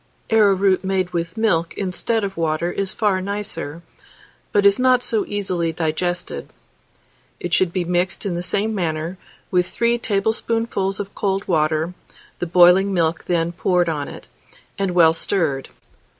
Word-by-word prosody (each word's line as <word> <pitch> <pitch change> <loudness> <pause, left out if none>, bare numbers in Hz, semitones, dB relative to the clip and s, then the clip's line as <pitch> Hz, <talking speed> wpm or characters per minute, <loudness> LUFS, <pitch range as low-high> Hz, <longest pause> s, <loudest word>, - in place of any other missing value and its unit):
Arrowroot 200 -3 +4
made 190 -1 0
with 170 +1 -3
milk 170 -7 +1
instead 205 +4 -1
of 195 -1 -3
water 165 +1 0
is 195 +1 -2
far 205 -4 +1
nicer, 185 -5 -5 0.7
but 205 -1 +2
is 200 +2 +5
not 255 -1 +4
so 220 -3 -1
easily 185 -5 -1
digested. 175 +2 -3 0.9
It 175 -1 -4
should 180 -1 +3
be 180 -1 -1
mixed 175 +2 -1
in 195 - -1
the 175 - -2
same 200 +5 -1
manner, 170 -1 -2 0.3
with 180 -1 +2
3 235 +3 +1
tablespoonfuls 220 -2 -1
of 200 0 -5
cold 195 0 -1
water, 155 0 +1 0.5
the 175 - -2
boiling 180 +3 +6
milk 165 -1 0
then 170 -1 +1
poured 175 0 +1
on 145 -3 -2
it, - - -10 0.5
and 195 -3 -2
well 165 -2 +6
stirred. 160 -6 -1
185 Hz, 150 wpm, -21 LUFS, 170-200 Hz, 0.9 s, boiling